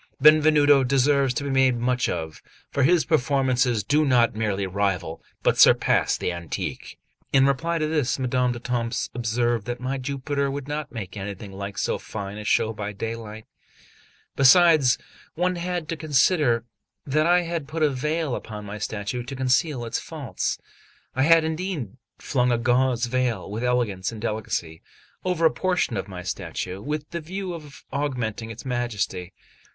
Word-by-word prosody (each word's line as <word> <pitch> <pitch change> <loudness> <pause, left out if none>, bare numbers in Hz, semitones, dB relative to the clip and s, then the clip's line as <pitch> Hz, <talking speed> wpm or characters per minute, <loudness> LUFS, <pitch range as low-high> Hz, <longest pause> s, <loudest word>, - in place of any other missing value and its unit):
Benvenuto 150 -1 +6
deserves 135 +1 +3
to 140 - -1
be 140 - -2
made 130 -1 +4
much 125 +1 0
of, 80 -2 -4 0.3
for 140 - 0
his 165 +5 +4
performances 130 -6 +2
do 150 +8 +2
not 125 -5 +3
merely 105 -3 -1
rival, 95 -4 -2 0.2
but - - +2
surpass - - +5
the - - -2
antique." 85 -2 -5 0.3
In 135 -1 +5
reply 165 +5 +1
to 155 - 0
this, 150 -4 0
Madame 125 -1 +1
d'Etampes 120 -1 -2
observed 120 -1 0
that 120 0 -3
my 130 +2 -3
Jupiter 140 +1 -2
would 140 0 -5
not 150 0 -4
make 110 -8 -7
anything 100 0 -6
like 100 +1 -6
so - - -1
fine 100 -1 -6
a - - -6
show 110 +1 +2
by 105 -1 -5
daylight; 110 0 -6 0.9
besides, 150 -1 +6 0.4
one 180 +2 +1
had 175 -2 -3
to 165 - -1
consider 145 -5 +2 0.4
that 155 +3 +2
I 175 +1 +5
had 165 -4 -4
put 155 +1 -2
a 150 - +5
veil 150 +2 -1
upon 105 -3 -6
my 105 +1 -7
statue 105 +4 -3
to 130 +3 -7
conceal 130 0 +1
its 115 - -2
faults. 150 -7 -3 0.6
I 130 - +1
had 165 +3 +6
indeed 160 - -3 0.2
flung 125 -3 0
a 120 - +2
gauze 125 0 +2
veil 120 -5 -1
with 110 +3 -4
elegance 120 -7 0
and 115 - -8
delicacy 105 -7 -3 0.4
over 180 -3 +1
a 160 - +6
portion 180 -10 0
of 95 - -3
my 90 -2 -7
statue, 90 +1 -4
with 150 +5 -4
the 170 -1 -4
view 185 +3 -5
of 155 -2 -10
augmenting 125 -6 -2
its 115 +3 -9
majesty. 110 -7 -2
125 Hz, 165 wpm, -24 LUFS, 110-150 Hz, 0.9 s, Benvenuto